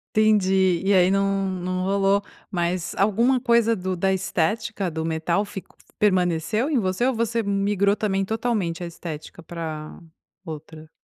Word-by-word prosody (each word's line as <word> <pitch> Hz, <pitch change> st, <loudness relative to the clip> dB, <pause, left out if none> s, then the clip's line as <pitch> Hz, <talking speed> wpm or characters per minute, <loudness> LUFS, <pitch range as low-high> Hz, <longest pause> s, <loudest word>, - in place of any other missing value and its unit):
Entendi. 190 Hz, -4 st, +3 dB
E 200 Hz, -, +3 dB
aí 185 Hz, -1 st, +5 dB
não 195 Hz, 0 st, +1 dB
não 185 Hz, 0 st, -3 dB
rolou, 195 Hz, +1 st, +2 dB, 0.3 s
mas 175 Hz, -2 st, -2 dB
alguma 230 Hz, +6 st, +3 dB
coisa 235 Hz, -2 st, +3 dB
do 185 Hz, -1 st, -3 dB
da 190 Hz, +2 st, +1 dB
estética 195 Hz, +2 st, -1 dB
do 160 Hz, 0 st, -4 dB
metal 165 Hz, +5 st, 0 dB
fic 195 Hz, -2 st, -8 dB, 0.3 s
permaneceu 185 Hz, -, +1 dB
em 285 Hz, -5 st, +2 dB
você, 190 Hz, +3 st, 0 dB
ou 265 Hz, -, +2 dB
você 230 Hz, 0 st, 0 dB
migrou 200 Hz, 0 st, +1 dB
também 195 Hz, -2 st, 0 dB
totalmente 210 Hz, -6 st, -1 dB
a -, -, -4 dB
estética 165 Hz, -1 st, -8 dB
pra 160 Hz, -2 st, -6 dB, 0.5 s
outra? 155 Hz, -1 st, -9 dB
195 Hz, 145 wpm, -24 LUFS, 175-210 Hz, 0.5 s, aí